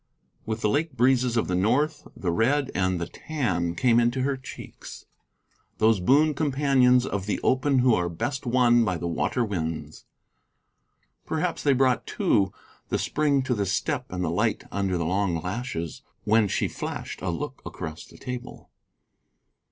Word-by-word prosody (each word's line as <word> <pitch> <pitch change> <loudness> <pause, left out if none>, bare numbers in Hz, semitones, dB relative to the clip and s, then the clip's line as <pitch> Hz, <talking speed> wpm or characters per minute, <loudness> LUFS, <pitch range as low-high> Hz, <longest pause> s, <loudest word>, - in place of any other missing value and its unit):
With 110 0 -3
the 105 - +2
lake 150 +4 0
breezes 125 -1 +2
of 115 - +1
the 90 - -2
north 130 +12 +1
the 90 - -1
red 130 +9 +1
and 95 -1 0
the 85 - -2
tan 90 - -2
came 120 +4 +4
into 120 +2 +1
her 140 0 +1
cheeks, 130 0 -10 0.7
those 110 -2 +4
boon 145 +11 +4
companions 135 -4 +3
of 100 -4 -3
the 105 - -1
open 135 +1 +2
who 125 - +6
are 90 -4 +1
best 120 - -3
won 120 -1 +4
by 95 -5 0
the 85 - -4
water 115 +8 0
winds. 80 -6 -4 1.2
Perhaps 170 +3 -1
they 140 - +3
brought, 130 -1 +2
too, 95 -1 +1 0.4
the - - +1
spring 145 -3 +1
to 130 - 0
the 100 -4 -1
step 125 - -1
and 90 0 -2
the 80 - -1
light 105 +6 0
under 95 -2 0
the 85 - -1
long 90 -1 0
lashes 90 - -4 0.2
when 110 0 +3
she - - 0
flashed - - -6
a 95 - -2
look 85 -3 -4
across 80 0 -7
the - - -16
table. 125 0 -8
115 Hz, 165 wpm, -26 LUFS, 95-130 Hz, 1.2 s, who